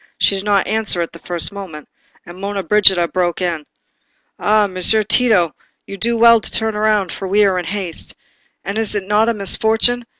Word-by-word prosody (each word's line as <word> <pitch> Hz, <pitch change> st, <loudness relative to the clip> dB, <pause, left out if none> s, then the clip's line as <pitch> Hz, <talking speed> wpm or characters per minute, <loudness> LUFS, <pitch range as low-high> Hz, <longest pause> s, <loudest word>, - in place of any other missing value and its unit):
She -, -, +2 dB
did 195 Hz, 0 st, -4 dB
not 200 Hz, -2 st, +1 dB
answer 215 Hz, -4 st, -1 dB
at 170 Hz, -, -4 dB
the 170 Hz, -, -13 dB
first 175 Hz, +1 st, 0 dB
moment, 185 Hz, -7 st, -10 dB, 0.4 s
and 175 Hz, -, -12 dB
Monna 200 Hz, 0 st, -4 dB
Brigida 190 Hz, -2 st, +4 dB
broke 175 Hz, -1 st, -2 dB
in. 170 Hz, -5 st, -4 dB, 0.7 s
"Ah, 210 Hz, 0 st, +2 dB
Messer 195 Hz, +3 st, +2 dB
Tito, 205 Hz, -7 st, +2 dB, 0.3 s
you 195 Hz, -, -9 dB
do 230 Hz, +3 st, -1 dB
well 230 Hz, 0 st, +5 dB
to -, -, -3 dB
turn 220 Hz, 0 st, 0 dB
round, 210 Hz, -3 st, 0 dB
for 195 Hz, -, -7 dB
we 205 Hz, +2 st, +2 dB
are 190 Hz, -2 st, 0 dB
in 175 Hz, -, -6 dB
haste. 185 Hz, -2 st, -5 dB, 0.5 s
And 200 Hz, +3 st, -4 dB
is 220 Hz, -1 st, -1 dB
it 200 Hz, -2 st, -3 dB
not 210 Hz, +2 st, +2 dB
a -, -, 0 dB
misfortune? 220 Hz, +4 st, +1 dB
200 Hz, 195 wpm, -17 LUFS, 180-215 Hz, 0.7 s, well